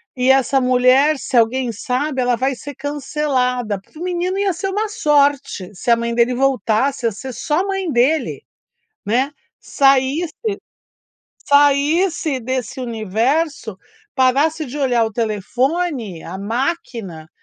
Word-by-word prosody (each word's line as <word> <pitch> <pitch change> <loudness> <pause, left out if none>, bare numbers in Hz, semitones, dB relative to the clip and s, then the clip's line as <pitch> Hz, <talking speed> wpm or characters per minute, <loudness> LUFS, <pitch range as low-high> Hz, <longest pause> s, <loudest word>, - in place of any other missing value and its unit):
E 255 0 +1
essa 270 0 +4
mulher, 255 +4 +4
se 260 - -2
alguém 240 +2 +2
sabe, 255 +5 -2
ela 245 -1 +2
vai 265 +3 0
ser 285 +3 -9
cancelada 265 -6 -1
para 250 - -20
o - - -5
menino 360 +1 -1
ia 400 -1 +1
ser 365 +3 -4
uma 420 +3 -2
sorte, 285 - +1
se 195 - -5
a 235 - +7
mãe 235 0 -2
dele 240 +1 +2
voltasse 260 0 +1
a - - 0
ser 260 +5 -7
só 300 +7 0
a 390 - -3
mãe 385 -2 -2
dele, 275 +5 +1 0.6
né, 250 +7 +1 0.3
saísse 275 +4 +2 1.2
saísse 290 +2 +3
desse 260 +2 -3
universo 230 - -1 0.4
parasse 285 +5 +2
de 270 +2 -7
olhar 245 -5 +2
o 220 - -4
telefone, 235 - -2
a 180 +3 -7
máquina, 225 - -4
265 Hz, 140 wpm, -19 LUFS, 235-300 Hz, 1.2 s, a